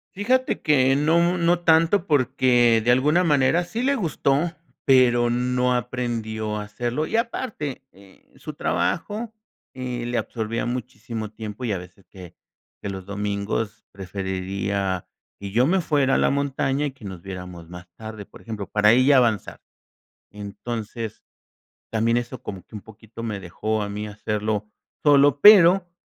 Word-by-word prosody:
Fíjate 255 +6 0
que 135 -3 +3
no 160 +4 +3
mu 175 +1 +2
no 170 +1 +2
tanto 165 +3 +3
porque 125 -4 +3
de 120 - -1
alguna 150 +8 +3
manera 150 +3 +3
sí 230 +7 -4
le 280 +1 +2
gustó, 165 - 0 0.3
pero 120 -2 +4
no 125 +1 +1
aprendió 115 -3 -3
a 105 - -4
hacerlo 120 +8 -3
y, 225 - -1
aparte, 220 - -3
eh, 95 0 -20
su - - -8
trabajo, 220 +2 -2 0.4
eh, 125 -2 -4
le 120 0 -2
absorbía 115 +1 -3
muchísimo 115 -3 -5
tiempo 110 +2 -7
y 110 - -1
a - - -1
veces, 90 +2 -13
que 90 -3 -12 0.5
que - - -5
los 95 -1 -6
domingos 100 +1 -3
preferiría 95 0 -3 0.3
que 100 -1 -7
yo 120 +5 +3
me 185 +1 +2
fuera 140 -4 +2
a - - +3
la - - +3
montaña 140 0 0
y 140 - -2
que 130 -4 -20
nos 95 -3 -7
viéramos 90 -3 -8
más 90 0 -11
tarde, 110 -2 -8
por - - -16
ejemplo, 110 -4 -6
para 105 +1 +4
ella 130 +2 +5
avanzar. 115 -4 +1 0.7
Entonces, 110 +2 -6 0.7
también 115 +1 +1
eso 120 0 -4
como 95 -3 -7
que - - -11
un 105 - -8
poquito 110 +1 -12
me 105 -3 -4
dejó 110 +4 -3
a 100 - -3
mí 105 +1 -5
hacerlo 105 0 -3 0.3
solo, 145 -1 +5
pero, 185 -2 +7
120 Hz, 155 wpm, -23 LUFS, 105-140 Hz, 0.7 s, pero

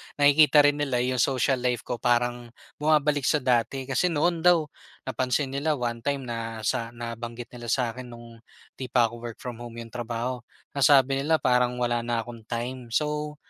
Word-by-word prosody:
nakikita 145 +1 +6
rin 145 0 +3
nila 130 -4 0
'yong 125 0 -1
social 130 0 +2
life 125 -1 -1
ko 120 - -4
parang 120 0 0 0.3
bumabalik 150 -2 +2
sa 150 -4 +2
dati, 125 +1 +1
kasi 135 +7 0
noon 170 +1 +1
daw, 175 -1 +4 0.4
napansin 130 +1 -1
nila 150 +3 0
one 120 -3 -3
time 140 +2 -2
na 115 -2 -5
sa 115 -1 0
nabanggit 120 +1 -7
nila 120 -1 -9
sa'kin 125 0 -1
no'ng 120 -1 -12 0.4
hindi 130 - -4
pa 120 -3 +2
ako 120 - -9
work 120 -1 -7
from 120 -2 -6
home 120 -1 -9
'yong 115 -1 -8
trabaho, 120 +1 -3 0.3
nasabi 135 -1 +4
nila 155 +4 +2
parang 125 -3 +2
wala 120 0 +1
na 115 -1 -2
akong 115 -2 -11
time. 120 +1 -4
So, 150 0 -1
125 Hz, 180 wpm, -26 LUFS, 120-140 Hz, 0.4 s, nakikita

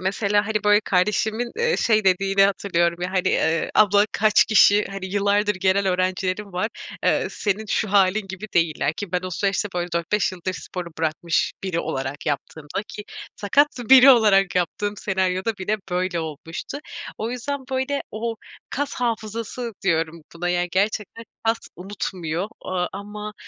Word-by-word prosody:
mesela, 200 +2 +1
hani, 210 -1 -1
böyle, 210 0 +5
kardeşimin, 215 +4 0
eee, 475 0 +2
şey 215 -2 +2
dediğini 195 +1 +3
hatırlıyorum, 175 -3 +1
ya, 180 - -2
hani, 185 0 +1
eee, 160 +1 +1
"Abla, 205 0 +5
kaç 215 0 +4
kişi, 210 -1 +5
hani, 195 -1 -5
yıllardır 205 +2 +1
gelen 190 +1 +2
öğrencilerim 185 +2 -1
var, 180 +5 -1 0.4
eee, - - +2
senin 210 +1 -2
şu 210 0 -1
hâlin 200 +1 +3
gibi 190 +3 -7
değiller." 165 -3 +1
ki 185 +2 -7
ben 180 - +1
o 185 - -5
süreçte, 200 +3 0
böyle, 175 0 -1
4-5 185 +4 0
yıldır 185 +1 -4
sporu 180 -1 -6
bırakmış 165 +1 0
biri 180 -3 -1
olarak 135 0 -4
yaptığımda 150 +5 -3
ki 210 - -8 0.3
sakat 280 +9 +3 0.2
biri 265 +1 +10
olarak 205 -6 +5
yaptığım 205 +4 -1
senaryoda 190 +2 -1
bile 205 +3 -1
böyle 180 -1 -1
olmuştu 160 - -6 0.4
O 220 +2 -2
yüzden, 270 +3 -3
böyle, 265 +2 -1
o 225 +1 -3 0.3
"kas 285 +1 -2
hafızası" 230 0 -3
diyorum 165 -2 0
buna, 175 +1 -3
yani, 175 0 0
gerçekten 210 +3 -1 0.2
kas 225 0 +2 0.2
unutmuyor 180 -1 -4
o - - -11
aaa, 180 -1 0
ama, 210 +1 -7
195 Hz, 155 wpm, -23 LUFS, 180-215 Hz, 0.4 s, biri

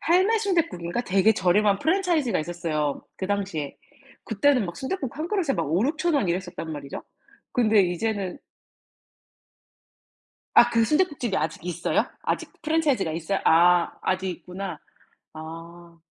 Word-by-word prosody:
할매순대국인가 345 - +1
되게 195 +1 +3
저렴한 200 +1 +2
프랜차이즈가 330 - +1
있었어요, 155 -3 -2
그 190 - -3
당시에. 190 -8 -2 0.5
그때는 240 0 +2
막 170 - -7
순댓국 270 -2 -4
1 320 +2 -3
그릇에 360 -10 0
막 - - 0
5,000-6,000 305 - +1
원 270 -11 +1
이랬었단 175 -2 -3
말이죠. 140 -2 -7 0.5
근데 220 -4 +4
이제는 190 +1 -2 2.2
아 240 - +8
그 230 -1 +3
순댓국집이 290 - +1
아직 160 +1 -2
있어요? 175 -1 0 0.2
아직 - - -2
프랜차이즈가 300 - +1
있어요? 170 +4 -2
아 175 +1 +5
아직 190 0 0
있구나. 180 -1 -6 0.6
아. 165 +2 -10
195 Hz, 295 characters per minute, -25 LUFS, 170-285 Hz, 2.2 s, 아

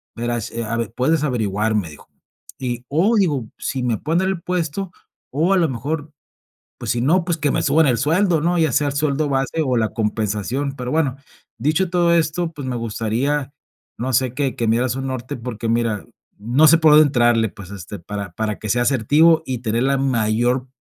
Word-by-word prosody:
verás 120 -2 -3
eh, 115 - -4
a 115 +1 -2
ver, 115 -3 -3
puedes 150 +4 +1
averiguar", 110 -5 0
me 95 -7 -1
dijo. 75 - -14 0.5
Y, 125 -1 -4
oh, 185 +11 +2
digo, 145 - 0
si 130 -3 -3
me 120 -3 0
pueden 160 - 0
dar 190 - 0
el 190 -3 -3
puesto, 180 +1 -3 0.4
o 165 +7 +2
a - - +3
lo 170 -2 +3
mejor, 145 +5 -4 0.7
pues - - -3
si 120 - 0
no, 170 +7 +3
pues 170 -2 -1
que 145 -2 0
me - - 0
suban 150 +1 +3
el 125 - +2
sueldo, 165 - +2
¿no? 175 +2 +1
Ya 160 -5 +2
sea 145 0 +2
el 140 - -2
sueldo 145 0 0
base 135 +4 0
o 125 -2 +1
la 110 -1 +1
compensación, 110 +5 -2
pero 125 0 -4
bueno, 145 -4 +1 0.4
dicho 155 +9 +1
todo 175 -1 +2
esto, 165 +1 0
pues 145 -4 -7
me 125 - -2
gustaría, 120 +6 -2 0.4
no 130 +3 -2
sé, 130 0 +2
que 135 -1 -1
que 115 - -1
me 110 - +3
dieras 125 0 0
un 135 0 -4
norte, 130 -1 -4
porque 115 -1 -5
mira, 115 -3 0 0.3
no 125 +9 +3
sé 165 - +7
por 160 -1 +5
dónde 155 0 +8
entrarle, 120 -4 +3
pues, 100 -1 -12
este, 100 0 -8
para 100 0 -6
para 110 0 -3
que 110 - -6
sea 120 +3 +2
asertivo 150 +7 +4
y 125 -3 -3
tener 115 +1 -1
la 135 +1 +2
mayor 125 0 +1
130 Hz, 210 wpm, -20 LUFS, 115-155 Hz, 0.7 s, dónde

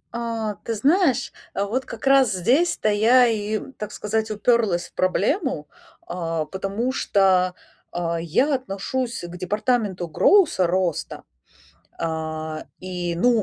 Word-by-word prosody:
А, 230 -2 -2
ты 230 - -2
знаешь, 275 - +2 0.2
а 200 - 0
вот 255 +6 -2
как - - -8
раз 270 -4 +5
здесь-то 240 - +2
я 235 +4 +5
и, 215 -1 -1 0.2
так 210 -1 -5
сказать, 220 +1 -2
уперлась 210 -4 +1
в - - -37
проблему. 200 - 0 0.4
А, 165 -3 -2
потому 195 +8 -2
что, 185 -5 +2 0.4
а, 170 -1 -2
я 195 - +1
отношусь 255 +1 -3
к 175 0 -8
департаменту 205 -1 -1
гроуса- 190 - +4
роста. 180 -2 -1 0.8
А, 160 -1 -4
и 180 -2 -4
ну, 235 +4 +3
205 Hz, 125 wpm, -23 LUFS, 175-245 Hz, 0.8 s, раз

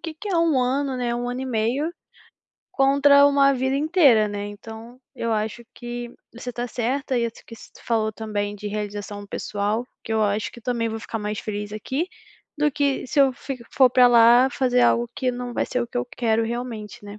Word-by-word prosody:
que 325 -1 -6
que 365 +7 -8
é 360 - +1
1 330 -5 +3
ano, 270 +1 0
né, 240 -1 -1
1 240 0 -3
ano 250 +1 -4
e - - -4
meio, 255 +7 -1 0.8
contra 280 +1 +5
uma 280 -1 +4
vida 265 +1 0
inteira, 285 - +4
né, 205 0 -4
então 225 +4 -10
eu 230 -2 -2
acho 220 +2 -2
que 240 0 -6 0.2
você 245 +1 -7
tá 240 +1 -3
certa 255 +3 -1
e 235 - +1
isso 230 - -10
que 230 - -11
se - - -15
tu - - -17
falou 220 -2 0
também 205 -1 -3
de 205 +1 -6
realização 205 0 -5
pessoal, 205 +3 -2 0.2
que 225 - -4
eu 220 - +2
acho 210 +1 -1
que 235 - -12
também 235 -1 -1
vou 225 0 -5
ficar 225 - -5
mais 210 0 -4
feliz 205 -1 -5
aqui 265 - -3 0.5
do 300 0 +2
que 280 -2 0
se 285 - +1
eu 270 -1 +5
fico 250 -1 -7
for 260 -2 +5
para 250 0 +6
lá 240 +2 +6
fazer 250 -1 +1
algo 240 0 +3
que 255 - 0
não 245 0 -5
vai - - 0
ser 250 - -2
o - - -4
que 245 - -3
eu 245 - -2
quero 225 -1 +1
realmente, 225 -3 -6
né, 205 0 -9
240 Hz, 215 wpm, -23 LUFS, 220-265 Hz, 0.8 s, para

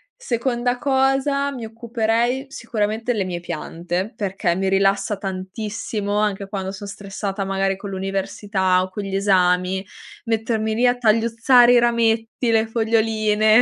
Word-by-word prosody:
Seconda 245 - -1
cosa, 275 +1 +1
mi 250 -4 -6
occuperei 235 +3 -1
sicuramente 225 -1 -2
le 205 -4 -1
mie 175 -2 -4
piante, 175 +3 -4
perché 195 -4 -1
mi 190 +1 0
rilassa 195 +1 +2
tantissimo 205 +2 -4
anche 205 -2 0
quando 195 -1 -4
son 200 +1 -8
stressata 200 0 -4
magari 195 0 0
con 200 +1 -8
l'università 195 0 0
o 185 - -3
con 200 +2 -5
gli 195 -1 -4
esami, 190 -1 +2 0.4
mettermi 220 -1 -1
lì 245 +2 +3
a 245 - +3
tagliuzzare 235 +2 +4
i 245 - +6
rametti, 230 0 +1
le 225 0 +3
foglioline. 220 -1 +3
215 Hz, 135 wpm, -21 LUFS, 195-235 Hz, 0.4 s, i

